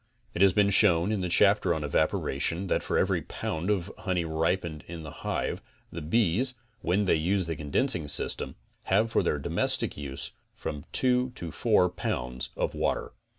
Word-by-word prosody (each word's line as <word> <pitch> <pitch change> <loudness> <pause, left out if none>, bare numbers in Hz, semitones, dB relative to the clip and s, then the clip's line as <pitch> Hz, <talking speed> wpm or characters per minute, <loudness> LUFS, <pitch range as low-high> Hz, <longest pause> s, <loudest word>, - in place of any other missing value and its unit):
It 85 - -3
has 100 -1 +7
been 100 0 +3
shown 95 -2 +6
in 105 -3 -1
the 90 - -2
chapter 100 -1 +4
on 80 - -3
evap 75 +2 +2
oration 80 +7 -2
that - - +1
for - - -1
every - - +1
pound 80 +5 -4
of 100 -2 0
honey 90 -3 -1
ripened 80 0 -1
in 85 -1 -7
the 75 - -8
hive - - -2 0.3
the 85 - -6
bees, 115 - +1 0.3
when 95 +4 +1
they - - +3
use 90 +4 +1
the 80 -1 -3
condensing 80 - 0
system, 75 - +1 0.3
have 110 +4 +2
for - - +3
their 75 - 0
domes 70 - +1
tictic - - -4
use 70 -3 -6 0.2
from 75 +1 -6
two 125 0 +2
to 85 -8 -6
four 105 +2 +3
pounds 65 -8 -4
of - - -1
water. - - -1
85 Hz, 185 wpm, -28 LUFS, 80-100 Hz, 0.3 s, has